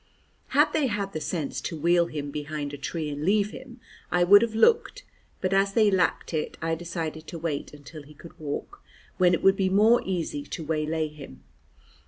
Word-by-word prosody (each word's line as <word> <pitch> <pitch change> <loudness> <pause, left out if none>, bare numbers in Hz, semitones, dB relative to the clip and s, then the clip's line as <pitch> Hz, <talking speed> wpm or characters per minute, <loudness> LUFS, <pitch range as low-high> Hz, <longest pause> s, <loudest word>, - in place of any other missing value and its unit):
Had - - +3
they 295 -3 +2
had 200 -3 -3
the 155 - -4
sense 160 -4 -3
to 165 - -5
wheel 170 +2 +3
him 145 -3 -5
behind 145 0 -5
a - - -5
tree 160 +2 -3
and 145 +1 -5
leave 205 +3 +2
him, 255 -2 -11 0.3
I 175 0 +2
would 205 +3 +8
have 230 -2 -1
looked, 470 - +3 0.4
but 185 0 0
as 195 0 +2
they 215 -2 +4
lacked 185 -2 0
it, 155 -1 -3
I 165 0 -1
decided 165 -1 -5
to 170 - -6
wait 160 -3 -3
until 150 +2 -11
he 150 +1 -16
could 165 +3 -13
walk, 155 - -6 0.4
when 180 -1 +5
it - - -6
would 195 0 +6
be 190 -1 +1
more 215 +5 +5
easy 170 -6 -3
to 160 - -7
waylay 155 0 -1
him. 140 - -12
170 Hz, 200 wpm, -26 LUFS, 155-195 Hz, 0.4 s, would